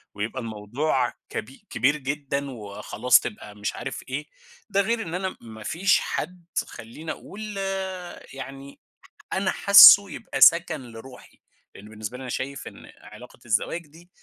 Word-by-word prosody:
ويبقى 110 +5 -4
الموضوع 120 +5 -2 0.2
كب 115 - -5 0.2
كبير 140 +4 +1
جدًا، 140 0 -3
وخلاص 115 +2 +1
تبقى 105 0 -8
مش 105 0 -4
عارف - - -6
إيه، 145 +3 -4 0.4
ده 200 -1 +2
غير 230 +3 -1
إن 165 -2 -7
أنا 185 0 -3
ما 110 -2 -11
فيش 185 - +2
حد 175 +2 -5 0.2
خلّيني 150 +9 -8
أقول 210 0 -8 0.8
يعني 135 +1 -9 0.5
أنا 190 0 0
حاسُّه 200 0 +9
يبقى - - -6
سَكَن 170 -3 +6
لروحي، 125 +3 -13 0.3
لإن 105 +2 -12
بالنسبة 110 +3 -7
لي - - -10
أنا 130 - -7
شايف 140 +1 -5
إن - - -12
علاقة 115 +4 -14
الزواج 150 +9 -1
دي، 165 +4 -18
135 Hz, 145 wpm, -25 LUFS, 115-170 Hz, 0.8 s, حاسُّه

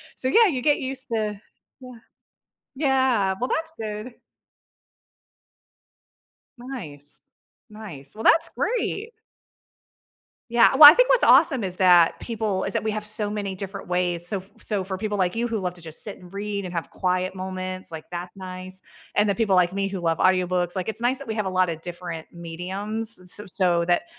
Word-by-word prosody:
So, 260 - -1
yeah, 455 - +6
you 270 -9 -2
get 290 +2 +2
used 265 0 -5
to 210 -2 -2 0.4
Yeah. 255 -1 -10 0.8
Yeah. 260 -8 +1
Well, 250 - 0
that's 320 0 -2
good. 215 +3 -6 2.5
Nice. 155 - -7 0.5
Nice. 185 -11 -9
Well, 220 - -7
that's 330 +5 +4
great. 455 -2 -3 1.4
Yeah. 235 +2 +5
Well, 290 +1 +12
I 305 - +6
think - - +4
what's - - +3
awesome 270 -9 +5
is 185 -2 -3
that 180 -3 +4
people 215 -5 -3
is - - -2
that - - -1
we 220 - -1
have 210 0 -4
so 210 0 +6
many 205 -2 -4
different 195 +1 -7
ways. 175 -1 -1
So 190 -1 -3 0.2
so 205 -3 -2
for 190 0 -5
people 210 +1 -3
like 185 -1 0
you 235 +1 -1
who 225 -2 -2
love 180 -2 -4
to 175 - -13
just 160 -1 -7
sit 205 - -6
and 180 0 -16
read 200 0 -4
and 180 - -7
have 165 -5 -4
quiet 185 0 -2
moments, 185 -1 -5
like, 160 -1 -8
that's 180 +1 -7
nice. 185 0 -8 0.3
And 205 0 +2
the 200 - +1
people 215 -5 +1
like 180 0 +3
me 195 0 -1
who 195 -1 -5
love 165 -2 0
audiobooks, 180 -1 +2
like, 185 +2 -3
it's 220 - -5
nice 250 +2 +1
that - - -10
we 220 - -3
have 215 -2 -2
a - - -1
lot 185 -1 +2
of 160 -1 -5
different 175 -2 -7
mediums 190 +7 -2
s 180 +2 +1
s 205 -3 -8
so 175 -3 +2
that 175 0 +1
195 Hz, 190 wpm, -24 LUFS, 180-225 Hz, 2.5 s, Well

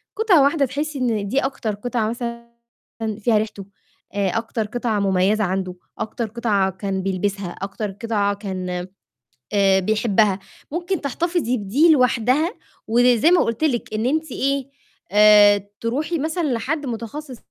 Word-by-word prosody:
قطعة 400 -9 +4
واحدة 280 0 +3
تحسي 285 +3 -4
إن 225 -5 0
دي 265 - +2
أكتر 260 -6 -2
قطعة 220 0 -2
مثلًا 235 0 -5 0.7
فيها 220 0 +2
ريحتُه، 210 -2 -5 0.5
آآ، 200 -1 0
أكتر 225 -1 -2
قطعة 230 -1 -1
مميزة 195 +2 +2
عندُه، 185 -1 -2 0.2
أكتر 225 +1 -3
قطعة 210 -4 0
كان 190 0 -3
بيلبسها، 195 -1 -2
أكتر 200 +1 -4
قطعة 205 0 -1
كان 185 -3 -4 0.7
آآ، 195 -1 +4
بيحبها، 210 0 +2 0.3
ممكن 350 +3 -2
تحتفظي 305 -2 -1
بدي 250 - +3
لوحدها، 255 - +2 0.3
وزي 245 +5 +4
ما 355 - +5
قُلت 230 +6 -2
لكِ 240 -7 -1
إن 215 +1 -1
أنتِ 310 +3 0
إيه 275 0 -1 0.4
آآ، 205 -1 +6
ترُوحي 290 +8 -1
مثلًا 320 +4 -2
لحد 290 +6 -2
متخصِّص 245 +4 -6
230 Hz, 135 wpm, -21 LUFS, 200-275 Hz, 0.7 s, آآ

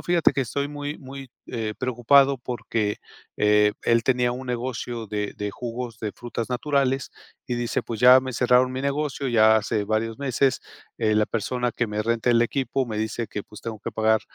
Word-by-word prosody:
fíjate 175 -2 +3
que 135 - 0
estoy 140 +4 -2
muy 145 0 -5
muy, 135 0 -9 0.2
eh, 110 -3 -3
preocupado, 130 +2 +3
porque 115 -4 -2 0.4
eh, 105 0 +4
él 115 -1 +2
tenía 125 -2 +2
un 130 +1 -6
negocio 120 -2 -4
de 105 -1 -3
de 105 0 -3
jugos 120 +1 -6
de 105 -2 -4
frutas 120 -1 -5
naturales 135 +1 0 0.4
y 120 - -1
dice 120 -1 -1
pues: 115 -2 -5
"Ya 125 +2 +8
me 130 0 -5
cerraron 125 +1 +3
mi 130 +1 -4
negocio 140 0 -2
ya 110 -3 +5
hace 105 0 0
varios 110 +4 -2
meses, 135 0 +1 0.4
eh, 110 -1 +2
la 105 - +3
persona 120 +3 -2
que 120 - -1
me 105 0 -2
renta 115 +2 +1
el 115 0 +4
equipo 130 +1 -1
me 110 -2 -4
dice 110 +2 -2
que, 105 - -5
pues, 105 - -13
tengo 110 -3 -6
que 115 - -5
pagar, 110 0 +2
120 Hz, 190 wpm, -24 LUFS, 110-130 Hz, 0.4 s, Ya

